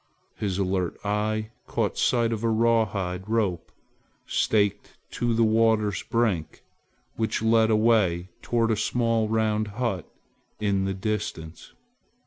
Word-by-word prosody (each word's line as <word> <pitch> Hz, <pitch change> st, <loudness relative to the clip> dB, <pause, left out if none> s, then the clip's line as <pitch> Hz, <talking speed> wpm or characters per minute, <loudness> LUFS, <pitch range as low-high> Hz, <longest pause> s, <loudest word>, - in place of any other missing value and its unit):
His 95 Hz, -3 st, -2 dB
alert 95 Hz, -3 st, -1 dB
eye 110 Hz, +1 st, -1 dB, 0.2 s
caught -, -, -1 dB
sight 115 Hz, -2 st, +2 dB
of 110 Hz, 0 st, -4 dB
a 115 Hz, -, +2 dB
rawhide 110 Hz, -5 st, 0 dB
rope 105 Hz, -6 st, -1 dB, 0.5 s
staked 105 Hz, -1 st, 0 dB
to 120 Hz, -1 st, 0 dB
the 115 Hz, -, +3 dB
water's 110 Hz, -2 st, +2 dB
brink, 105 Hz, -10 st, -1 dB, 0.5 s
which 110 Hz, -1 st, -1 dB
led 110 Hz, 0 st, +4 dB
away 105 Hz, -6 st, +2 dB
toward 115 Hz, -1 st, +1 dB
a -, -, +2 dB
small 115 Hz, 0 st, +1 dB
round 110 Hz, -1 st, +1 dB
hut 115 Hz, -9 st, -2 dB, 0.5 s
in 100 Hz, -2 st, +1 dB
the 95 Hz, 0 st, -2 dB
distance. 95 Hz, -5 st, -4 dB
110 Hz, 120 wpm, -26 LUFS, 95-115 Hz, 0.5 s, led